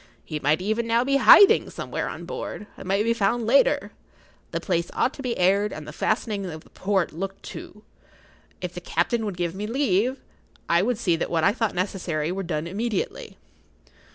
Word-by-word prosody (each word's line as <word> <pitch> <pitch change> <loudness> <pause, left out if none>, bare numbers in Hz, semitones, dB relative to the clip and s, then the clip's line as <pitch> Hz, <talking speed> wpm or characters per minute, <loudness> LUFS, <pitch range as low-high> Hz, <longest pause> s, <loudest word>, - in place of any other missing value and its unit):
He 155 -2 -4
might 150 +5 +1
even 220 +3 -1
now 230 +1 +3
be 275 +1 +2
hiding 390 +8 +7
somewhere - - -4
on - - -7
board, 210 - -6
and - - -10
might 195 +2 +2
be 230 +1 +2
found 230 +1 0
later. 280 - +3 0.6
The - - -3
place 170 -2 -1
ought 260 - +1
to - - -9
be 250 -3 -2
aired 195 +3 +3
and 155 -1 -8
the 150 - -8
fastening 205 +4 -1
of 155 -3 -8
the - - -22
port 190 -2 -1
looked 195 +4 -6
to. 210 +2 -10 0.8
If - - -4
the - - -7
captain 235 -2 0
would 200 -4 -4
give 175 -1 -1
me 205 +3 -4
leave, 250 0 +1 0.5
I 170 +1 +3
would 235 +3 0
see 180 -7 +1
that - - -2
what 165 -2 0
I 195 - +4
thought 225 -4 -1
necessary 175 -4 -2
were 195 +2 -3
done 155 -3 -3
immediately. 210 +4 -3
200 Hz, 195 wpm, -24 LUFS, 175-230 Hz, 0.8 s, hiding